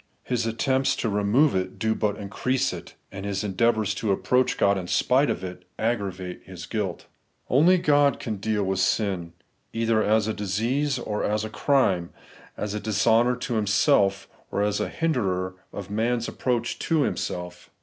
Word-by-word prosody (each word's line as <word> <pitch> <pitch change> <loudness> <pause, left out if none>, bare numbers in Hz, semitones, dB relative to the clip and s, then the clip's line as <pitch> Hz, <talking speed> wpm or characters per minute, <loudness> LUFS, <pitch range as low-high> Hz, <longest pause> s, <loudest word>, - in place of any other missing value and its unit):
His 120 -2 -1
attempts 130 +4 +1
to 115 - -1
remove 105 +9 +3
it 95 0 -2
do 110 0 +1
but 105 -2 -1
increase 125 +6 -1
it, - - -9 0.2
and 95 0 -7
his 100 0 -2
endeavours 105 0 +1
to 105 +1 -1
approach 125 +6 +1
God 100 0 +3
in 90 -2 -4
spite 130 +9 +2
of - - -2
it 90 -1 -7
aggra 110 -3 0
vate 90 -1 -8
his 95 -2 -9
guilt. 105 -6 -3 0.5
Only 165 +8 +5
God 145 -4 +3
can 110 -4 -4
deal 105 +1 -1
with 95 0 -1
sin, 95 -3 0 0.4
either 115 -1 +1
as 110 0 +2
a 110 - 0
disease 115 +8 -1
or 105 -4 -3
as 105 +1 0
a 110 - -7
crime; 100 -14 +2 0.5
as 105 -1 -3
a 105 - -2
dishonour 110 +3 +3
to 125 0 -4
Him 105 - -2
self, 100 -3 +3 0.2
or 100 - 0
as 105 0 0
a 105 -3 -1
hinderer 95 - -1 0.2
of 100 -1 -7
man's 115 +2 0
approach 120 -2 -2
to 160 -3 +1
Himself. 90 -7 -4
110 Hz, 175 wpm, -25 LUFS, 100-125 Hz, 0.5 s, Only